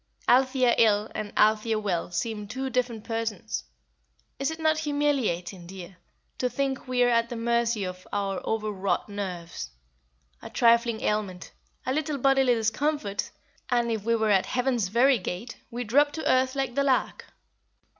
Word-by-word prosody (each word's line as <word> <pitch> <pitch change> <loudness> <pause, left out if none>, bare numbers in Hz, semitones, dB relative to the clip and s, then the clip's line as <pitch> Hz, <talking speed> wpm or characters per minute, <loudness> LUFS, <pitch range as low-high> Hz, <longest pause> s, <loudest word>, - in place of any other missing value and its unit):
Althea 255 -1 +4
ill 215 -1 +3
and 210 -1 -4
Althea 215 +1 +3
well 195 -6 -1
seem 210 +3 -3
two 260 +4 -4
different 240 -4 -1
persons. 225 -3 -3 0.7
Is 275 - 0
it 320 - -5
not 315 -1 +2
humiliating, 260 - -1
dear, 185 0 -10 0.4
to 250 - +1
think 270 0 -2
we 250 -1 +2
are - - +4
at 230 -1 +2
the 240 - -5
mercy 235 -2 +1
of 185 0 -7
our 195 -2 -2
over 215 -1 -1
wrought 195 +1 -1
nerves? 180 - -5 0.7
A - - -8
trifling 235 -1 +3
ailment, 205 -4 -2 0.3
a 260 - 0
little 300 0 -1
bodily 270 -2 +4
discomfort, 225 -1 -1 0.4
and, 240 -1 +1
if 220 -3 -2
we 230 +1 +2
are 220 -1 +1
at 190 -2 +3
heaven's 250 -5 0
very 240 +5 +4
gate, 185 +6 -5
we 240 +1 -4
drop 290 +6 +3
to 320 - -3
earth 260 +1 +3
like 270 -2 -1
the 280 +2 +1
lark." 270 -2 0
230 Hz, 160 wpm, -27 LUFS, 205-260 Hz, 0.7 s, Althea